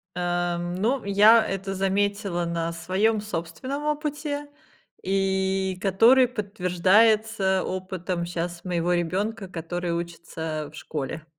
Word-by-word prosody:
Э, 175 Hz, -1 st, -1 dB
ну, 190 Hz, +10 st, -1 dB
я 210 Hz, +3 st, +6 dB
это 195 Hz, 0 st, -3 dB
заметила 195 Hz, -2 st, 0 dB
на 170 Hz, 0 st, -2 dB
своём 205 Hz, +6 st, +1 dB
собственном 210 Hz, -, -5 dB
опыте, 295 Hz, -1 st, -2 dB, 0.6 s
и 190 Hz, 0 st, 0 dB
который 230 Hz, +7 st, +5 dB
подтверждается 205 Hz, -1 st, +2 dB
опытом 185 Hz, -1 st, -3 dB
щас 175 Hz, 0 st, -4 dB
моего 175 Hz, 0 st, 0 dB
ребёнка, 195 Hz, +4 st, -1 dB
который 175 Hz, 0 st, -4 dB
учится, 165 Hz, -2 st, -4 dB
э, -, -, -10 dB
в -, -, -14 dB
школе. 150 Hz, +1 st, -5 dB
190 Hz, 110 wpm, -25 LUFS, 175-210 Hz, 0.6 s, я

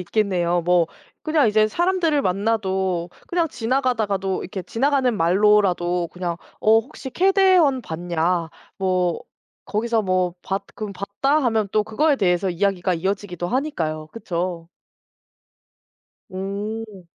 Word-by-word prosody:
있겠네요. 180 Hz, -3 st, 0 dB
뭐 175 Hz, -1 st, +3 dB, 0.4 s
그냥 310 Hz, -6 st, +3 dB
이제 215 Hz, 0 st, +4 dB
사람들을 345 Hz, -, +1 dB
만나도 190 Hz, -3 st, 0 dB, 0.2 s
그냥 340 Hz, -2 st, 0 dB
지나가다가도 225 Hz, -7 st, -1 dB
이렇게 190 Hz, +1 st, -6 dB
지나가는 260 Hz, +3 st, +1 dB
말로라도 180 Hz, -1 st, +3 dB
그냥 175 Hz, -1 st, -4 dB, 0.2 s
"어 220 Hz, +1 st, +5 dB
혹시 260 Hz, +3 st, -7 dB
케데헌 370 Hz, -7 st, +4 dB
봤냐?" 170 Hz, 0 st, -1 dB, 0.3 s
뭐 185 Hz, -3 st, 0 dB, 0.4 s
거기서 225 Hz, +1 st, 0 dB
뭐 185 Hz, -2 st, 0 dB
봤 195 Hz, +1 st, -3 dB
금 210 Hz, -2 st, -5 dB
"봤다." 235 Hz, +11 st, 0 dB
하면 225 Hz, -4 st, +1 dB
또 215 Hz, -, +3 dB
그거에 280 Hz, +8 st, +1 dB
대해서 185 Hz, -3 st, +1 dB
이야기가 180 Hz, 0 st, 0 dB
이어지기도 185 Hz, 0 st, -3 dB
하니까요. 165 Hz, -, -2 dB
그쵸? 175 Hz, -5 st, -4 dB, 1.6 s
음. 200 Hz, +1 st, -5 dB
200 Hz, 275 characters per minute, -22 LUFS, 180-230 Hz, 1.6 s, 어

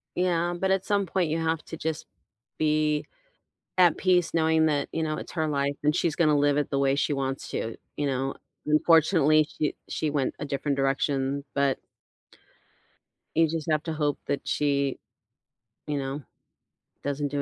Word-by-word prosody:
Yeah, 175 Hz, -1 st, +1 dB
but 190 Hz, +1 st, +1 dB
at 190 Hz, -1 st, +1 dB
some 200 Hz, -1 st, +1 dB
point, 180 Hz, -2 st, 0 dB
you 160 Hz, -, 0 dB
have 160 Hz, -1 st, 0 dB
to 165 Hz, -, -7 dB
just 160 Hz, 0 st, -3 dB, 0.5 s
be 150 Hz, -1 st, +1 dB, 0.7 s
at 180 Hz, -2 st, +5 dB
peace 180 Hz, -2 st, +2 dB
knowing 160 Hz, -1 st, +3 dB
that, 145 Hz, -2 st, 0 dB
you 165 Hz, -, -2 dB
know, 155 Hz, -1 st, -1 dB
it's -, -, -7 dB
her 160 Hz, -2 st, -1 dB
life, 140 Hz, -1 st, 0 dB
and 150 Hz, +1 st, +3 dB
she's 165 Hz, -3 st, +1 dB
gonna 155 Hz, -3 st, +3 dB
live 145 Hz, 0 st, +3 dB
it 145 Hz, -, 0 dB
the 140 Hz, -, 0 dB
way 135 Hz, 0 st, +3 dB
she 145 Hz, +1 st, +1 dB
wants 135 Hz, -1 st, -3 dB
to, 110 Hz, 0 st, -3 dB, 0.2 s
you 145 Hz, -, 0 dB
know? 135 Hz, 0 st, -1 dB, 0.3 s
Unfortunately, 155 Hz, 0 st, +4 dB
she 150 Hz, -, 0 dB
she 155 Hz, -, -1 dB
went 145 Hz, -3 st, -1 dB
a -, -, -3 dB
different 140 Hz, 0 st, -2 dB
direction, 135 Hz, 0 st, 0 dB
but 140 Hz, -1 st, +2 dB, 1.6 s
you 165 Hz, 0 st, +5 dB
just 160 Hz, 0 st, -3 dB
have 155 Hz, -1 st, +2 dB
to 160 Hz, -, -3 dB
hope 150 Hz, -2 st, 0 dB
that 140 Hz, -, -2 dB
she, 140 Hz, -2 st, +1 dB, 0.9 s
you 150 Hz, -1 st, -1 dB
know, 135 Hz, +1 st, -4 dB, 0.8 s
doesn't 145 Hz, 0 st, -1 dB
do 145 Hz, 0 st, -1 dB
150 Hz, 170 wpm, -27 LUFS, 140-160 Hz, 1.6 s, at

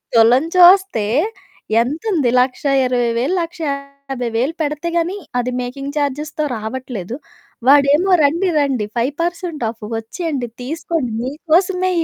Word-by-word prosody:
తులం 235 Hz, +4 st, +5 dB
చూస్తే 360 Hz, -, +6 dB, 0.8 s
ఎంతుంది, 305 Hz, -, 0 dB
1,20,000, 255 Hz, +1 st, +1 dB
1,50,000 280 Hz, -5 st, -3 dB
పెడితే 300 Hz, +3 st, -2 dB
గాని, 345 Hz, +4 st, -1 dB, 0.2 s
అది 250 Hz, +1 st, -1 dB
మేకింగ్ 275 Hz, +4 st, -6 dB
చార్జెస్‌తో 295 Hz, +2 st, -2 dB
రావట్లేదు. 220 Hz, -2 st, -5 dB, 0.5 s
వాడేమో 290 Hz, +6 st, +5 dB
రండి 340 Hz, +6 st, +2 dB
రండి 265 Hz, -7 st, 0 dB
5% 330 Hz, +4 st, -2 dB
ఆఫ్ 225 Hz, -1 st, -10 dB
వచ్చేయండి. 270 Hz, -, -4 dB, 0.2 s
తీసుకోండి 315 Hz, -2 st, -3 dB
మీకోసమే 355 Hz, +7 st, +1 dB
280 Hz, 95 wpm, -18 LUFS, 250-330 Hz, 0.8 s, చూస్తే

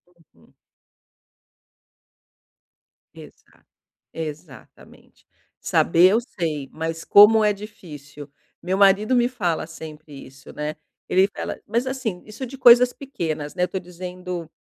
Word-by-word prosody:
Uhum. 165 Hz, -4 st, -27 dB, 2.6 s
Exato, -, -, -17 dB, 0.5 s
exatamente. 155 Hz, -4 st, -11 dB, 0.3 s
"Saber 175 Hz, +2 st, +3 dB
eu 220 Hz, -, +3 dB
sei, 160 Hz, -, -5 dB
mas 165 Hz, +1 st, -5 dB
como 215 Hz, +2 st, +7 dB
é 210 Hz, 0 st, +3 dB
difícil". 150 Hz, -9 st, -12 dB, 0.3 s
Meu 185 Hz, +2 st, -2 dB
marido 200 Hz, +4 st, +4 dB
me 240 Hz, 0 st, +3 dB
fala 180 Hz, -10 st, -2 dB
sempre 155 Hz, -2 st, -11 dB
isso, 135 Hz, +1 st, -15 dB
né. 150 Hz, +1 st, -4 dB, 0.3 s
Ele 190 Hz, +1 st, +4 dB
fala 200 Hz, -, -7 dB
mas, 235 Hz, +4 st, -1 dB
assim, 250 Hz, -9 st, -4 dB
isso 215 Hz, +5 st, -7 dB
de 265 Hz, +2 st, -10 dB
coisas 245 Hz, -1 st, +7 dB
pequenas, 165 Hz, -, -5 dB
né, 180 Hz, -, 0 dB
eu -, -, +1 dB
tô 190 Hz, +1 st, -4 dB
dizendo, 180 Hz, -1 st, -8 dB
180 Hz, 120 wpm, -22 LUFS, 160-215 Hz, 2.6 s, como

